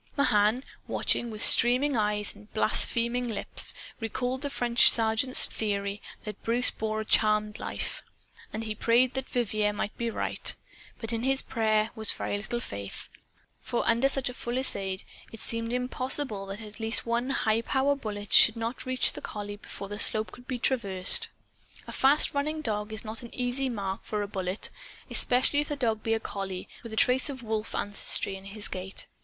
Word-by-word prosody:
Mahan, 215 -2 +3 0.2
watching, 240 - 0
with 215 -1 +1
streaming 255 +4 +6
eyes 210 -1 +1
and 210 +1 -17
blaspheming 235 +3 +1
lips, 225 - +3 0.3
recalled 250 +3 -3
the 285 - -3
French 240 -3 +4
sergeant's 225 +3 +4
theory 200 -1 -3 0.2
that 210 -2 -8
Bruce 240 +2 +1
bore 220 0 -3
a - - -6
charmed 215 -1 +2
life. - - -5 0.5
And 220 - -4
he 215 -1 -3
prayed 235 +4 +2
that 265 0 -4
Vivier 215 -3 0
might 205 0 -4
be 235 -1 -1
right. - - -2 0.4
But 225 0 -4
in 225 - -2
his 270 +2 0
prayer 215 -1 0
was 220 -2 +2
very - - -3
little 215 +4 -3
faith. 100 - -7 0.5
For 240 - -3
under 235 +4 +3
such 270 -1 0
a 250 - -3
fusillade 220 -7 0 0.3
it 225 - -10
seemed 230 0 -2
impossible 250 -3 -1
that 195 +3 -7
at 215 0 -10
least 225 +1 -1
one 235 +2 -1
highpower 265 +3 +1
bullet 210 -6 -6
should 225 - +8
not 230 +3 -5
reach 255 0 +2
the - - -8
collie 205 -1 -6
before 200 -1 -9
the 205 +1 -7
slope 215 0 +3
could 245 +1 -14
be 255 - -3
traversed. 200 -8 +4 0.6
A - - -8
fast 280 +3 +3
running 305 +2 -2
dog 210 -5 -2
is 220 +1 -3
not 220 +3 -5
an 235 - -10
easy 255 +2 -1
mark 195 -5 -4
for 210 -1 -3
a - - -5
bullet 190 0 -3 0.4
especially 255 +3 +3
if 295 - -1
the 295 - -2
dog 225 -6 -1
be 225 0 0
a - - -2
collie, 195 -3 -5
with 230 - -10
a - - -5
trace 255 +5 +4
of 260 -3 -7
wolf 220 -1 -3
ancestry 200 -1 +1
in 190 0 -11
his 205 +1 -3
gait. 190 +1 -5
225 Hz, 180 wpm, -28 LUFS, 210-250 Hz, 0.6 s, should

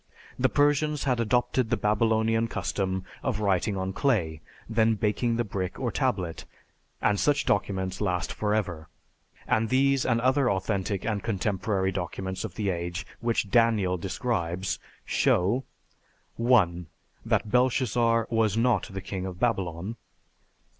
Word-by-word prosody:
The 130 +1 +3
Persians 145 +1 +2
had 125 -4 +1
adopted 120 +1 +1
the 115 - +1
Babylonian 110 +1 +2
custom 95 -4 -2 0.2
of 125 -6 -1
writing 100 0 +1
on 95 0 -2
clay, 90 - 0 0.3
then 110 0 +2
baking 110 +3 0
the 120 - +1
brick 95 -4 -4
or - - -1
tablet, 85 -3 -1 0.6
and 105 -1 +3
such 145 0 +2
documents 95 -2 -1
last 90 -4 -1
forever. 100 -7 -1 0.6
And 110 0 +1
these 135 +1 +3
and 115 -2 +2
other 130 +2 +3
authentic 95 0 -1
and 105 -3 -1
contemporary 95 -2 -1
documents 95 0 -4
of 100 -6 -6
the 100 -3 0
age 85 +1 -4
which 115 -4 -1
'Daniel' 110 -6 +3
describes 95 -2 -2 0.3
show: 105 +9 +2 0.7
1. 95 -8 +3 0.4
That 105 - 0
Belshazzar 120 -2 +2
was 110 -2 +2
not 115 -3 +2
the 95 0 -5
king 95 0 -4
of 90 -1 -7
Babylon. 100 -2 -1
105 Hz, 135 wpm, -27 LUFS, 95-115 Hz, 0.7 s, The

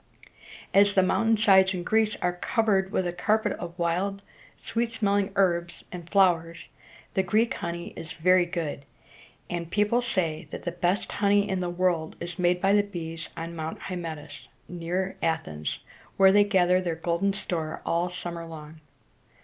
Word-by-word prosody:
As 200 +1 +5
the 190 - +5
mountain 220 +4 +2
sides 190 -3 +5
in 175 - -4
Greece 220 +2 +2
are 180 0 +1
covered 195 0 +1
with 185 - 0
a 175 - -2
carpet 215 +4 +1
of 175 -1 -7
wild, 190 +4 -1 0.3
sweet 230 0 -1
smelling 200 -3 +1
herbs 175 -3 +1
and 175 -2 -8
flowers, 170 -4 +2 0.4
the 190 - +2
Greek 215 +5 +1
honey 170 0 -5
is 165 -1 -7
very 180 +1 +3
good; 165 -5 -4 0.6
and 170 -1 -4
people 210 +5 +2
say 165 -9 -1
that - - -7
the 175 - -2
best 175 +3 -1
honey 205 0 +2
in 190 -2 -1
the 180 -1 -2
world 175 -3 0
is 170 +1 -6
made 180 0 +2
by 195 +2 +3
the 205 - +5
bees 165 -5 -6
on 165 +1 -5
Mount 160 0 -4
Hy 185 - -6
met´tus, 155 -4 -7 0.2
near 180 +2 -3
Athens, 80 - -2 0.4
where 195 0 +7
they 205 +1 +5
gather 185 -2 +3
their 170 -3 -2
golden 170 +4 0
store 170 -5 -3
all 170 +2 0
summer 175 -1 -5
long. 155 -1 -10
180 Hz, 165 wpm, -27 LUFS, 170-200 Hz, 0.6 s, where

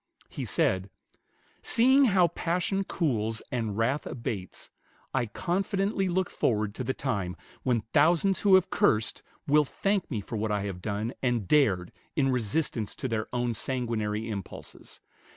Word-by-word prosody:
He - - -5
said, 95 +1 +1 0.7
"Seeing 265 +4 +5
how 185 -6 +4
passion 180 +4 -1
cools 115 - -1
and 115 -5 -2
wrath 130 +6 0
abates, 105 -6 -5 0.4
I 125 -3 +1
confidently 195 - -1
look 185 +1 0
forward 105 -3 0
to 130 - -4
the 130 +2 -2
time 100 -10 -2 0.3
when 120 -3 +1
thousands 170 +5 +4
who 200 -2 +6
have 190 - +3
cursed 110 0 +2 0.2
will 150 +1 +5
thank 195 +6 -1
me 115 -8 -2
for 105 +3 -5
what 110 0 -1
I 105 -1 0
have 95 -3 -5
done 105 +5 -2
and 120 -6 0
dared 100 -12 +3 0.2
in 140 -4 +2
resistance 120 -2 -1
to 130 - -3
their 110 -2 -2
own 120 -1 0
sanguinary 115 -3 -2
impulses.... 100 -4 -8
125 Hz, 150 wpm, -28 LUFS, 110-170 Hz, 0.7 s, who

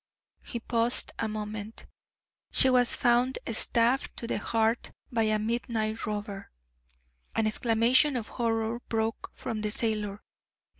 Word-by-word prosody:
He 235 - -5
paused 230 +1 +1
a 225 - 0
moment. 215 0 -6 0.7
"She 260 - +5
was 245 -1 +4
found 245 +2 +2
stabbed 235 +3 +1
to - - -4
the - - -1
heart 225 +1 0 0.2
by 230 -2 +1
a 215 - +2
midnight 220 0 -2
robber." 205 -2 -5 0.9
An 225 - +2
exclamation 235 +6 +3
of 230 -4 -3
horror 225 -1 -1
broke 225 0 -2
from 225 -3 -4
the 210 - -1
sailor. 210 -2 +1
225 Hz, 130 wpm, -28 LUFS, 215-240 Hz, 0.9 s, She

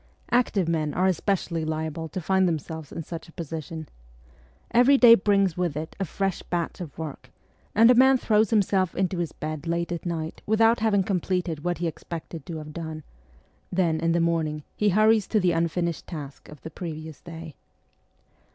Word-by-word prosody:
Active 225 -7 +2
men 155 -3 -1
are 185 - +2
especially 185 -2 0
liable 160 +1 -3
to 185 - -4
find 190 +2 +2
themselves 160 -2 -4
in 165 - -5
such 165 +1 -7
a - - -16
position. 160 -1 -6 0.8
Every 250 +4 +6
day 240 -3 +9
brings 195 -4 +3
with 175 -5 -1
it 155 +1 -5
a 195 - 0
fresh 195 +2 -2
batch 175 0 -3
of 155 -6 -8
work, 150 -5 -7 0.5
and 230 +3 +7
a - - +7
man 260 +2 +6
throws 215 -3 +2
himself 195 -4 +2
into 185 -1 0
his 170 -3 -2
bed 155 0 -5
late 170 +1 -1
at 170 - -3
night 165 -2 -4
without 225 +2 +4
having 210 -3 +2
completed 180 -4 -1
what 175 0 -1
he 175 - -2
expected 165 -2 -6
to 165 - -5
have 150 -1 -8
done; 160 -1 -6 0.7
then 170 -3 +1
in 165 +1 +1
the 170 - +2
morning 160 -3 0
he 210 - +2
hurries 215 +1 +4
to 215 - +2
the 180 -2 +2
unfinished 170 0 -1
task 145 -5 -8
of 150 - -12
the 160 - -8
previous 155 -3 -7
day. 165 -2 -9
170 Hz, 180 wpm, -26 LUFS, 160-195 Hz, 0.8 s, day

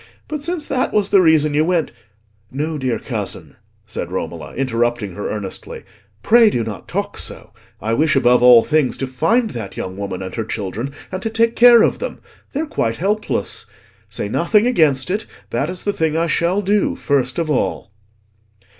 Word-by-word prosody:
But 300 -1 -4
since 340 0 -3
that 260 -3 -1
was 205 -1 +1
the 195 - +5
reason 155 -3 +4
you 150 +1 +3
went—" 170 -1 0 0.6
"No, 150 +3 -3
dear 130 -4 -1
cousin," 105 -7 -5 0.3
said - - -6
Romola, - - -5
interrupting 120 -5 -1
her 105 - -4
earnestly, 105 -3 -6 0.4
"pray 230 - +6
do 120 - -1
not 110 -5 -7
talk - - -3
so. - - -5 0.3
I 110 +2 -2
wish 155 +4 +2
above 125 -2 +4
all 120 -2 +8
things 155 -4 +1
to 135 - -2
find 200 - +1
that 110 -5 -7
young 95 0 -5
woman 100 -2 -4
and 95 - -7
her 115 - -2
children, 110 +6 -4 0.2
and 185 0 -4
to 225 - -2
take 230 +1 +1
care 240 -1 +7
of - - +1
them. - - -5 0.3
They 290 - -2
are - - -2
quite 115 - -2
helpless. 210 +4 -1 0.4
Say 105 0 -3
nothing 205 - +2
against 155 - +2
it; 210 +3 -2 0.2
that 140 +6 -1
is 180 0 -6
the 205 - 0
thing 160 -2 0
I 165 - +2
shall 175 +4 +1
do 205 +2 +1
first 130 -3 0
of 165 -2 -1
all." 125 -6 -1
155 Hz, 185 wpm, -19 LUFS, -, 0.6 s, all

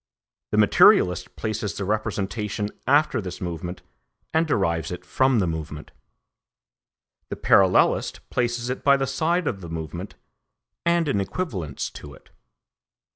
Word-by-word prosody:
The - - -1
materialist 90 -1 +4
places 110 -4 -3
the 100 - -3
representation 105 0 -2 0.2
after 145 -3 +3
this 90 -2 -7
movement 85 0 -5 0.5
and 160 +1 +2
derives 85 - 0
it 90 0 -7
from 130 +7 +2
the 100 - +2
movement; 80 -2 -5 1.4
the - - -3
parallelist 95 -2 +3
places 120 0 -1
it 130 - -5
by 140 -1 +5
the 135 - 0
side 165 +7 0
of 100 -4 -2
the 85 - -8
movement 80 -2 -6 0.7
and 170 -1 +2
in 100 -8 +1
equivalence 95 - -4
to 70 -1 -11
it. - - -22
105 Hz, 130 wpm, -24 LUFS, 90-130 Hz, 1.4 s, by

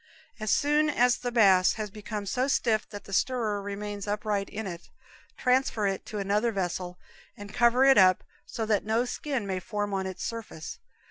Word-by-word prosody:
As 215 0 -3
soon 300 +4 +3
as 245 -3 +3
the 245 - -4
mass 195 -6 +5
has 215 -2 -5
become 210 0 -6
so 250 +7 0
stiff 230 -5 +1
that 205 -1 -8
the 195 - -10
stirrer 220 -2 0
remains 205 0 -5
upright 210 -1 -1
in 220 +1 -5
it, 175 -2 -8 0.5
transfer 250 -4 +1
it 195 -1 -2
to 215 - -5
another 205 +4 +1
vessel 180 -2 -3 0.4
and 205 -1 -10
cover 240 +2 +4
it 270 -5 +7
up 185 -1 +5 0.2
so 225 - -4
that 215 -2 +1
no 225 +3 +1
skin 255 -2 -3
may 190 -1 -2
form 205 +2 -3
on 190 -1 -1
its 185 -1 -6
surface. 225 -9 -6
210 Hz, 185 wpm, -28 LUFS, 195-235 Hz, 0.5 s, it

